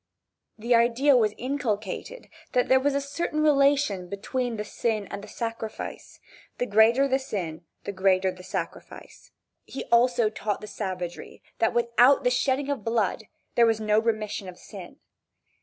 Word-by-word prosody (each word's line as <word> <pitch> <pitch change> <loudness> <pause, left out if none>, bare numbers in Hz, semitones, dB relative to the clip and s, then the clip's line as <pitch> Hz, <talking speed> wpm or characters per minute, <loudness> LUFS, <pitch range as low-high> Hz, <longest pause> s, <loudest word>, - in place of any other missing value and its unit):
The 235 +3 0
idea 240 +4 +4
was 215 -3 +2
inculcated 250 - -3 0.3
that 250 -1 +2
there 260 - +6
was 280 +1 0
a - - +2
certain 305 +2 -2
relation 275 -10 +3
between 240 +4 -3
the 210 - -4
sin 215 -1 -2
and 200 - -6
the - - -9
sacrifice, 225 -1 -6 0.4
the 245 - -1
greater 230 +5 +4
the 265 0 +1
sin, 175 -10 -5 0.2
the - - -4
greater 190 -1 +2
the 180 0 -12
sacrifice. 185 - -7 0.3
He 270 - -7
also 235 -2 +4
taught 210 -1 -3
the 210 - -9
savagery 185 -4 -6 0.2
that 225 +1 +1
without 240 +3 +4
the 250 - +3
shedding 265 +2 0
of 275 -7 -3
blood 220 -1 0 0.3
there 235 -1 +5
was 225 -1 +1
no 215 0 +2
remission 215 -3 -2
of 180 - -11
sin. - - -11
230 Hz, 155 wpm, -26 LUFS, 205-260 Hz, 0.4 s, there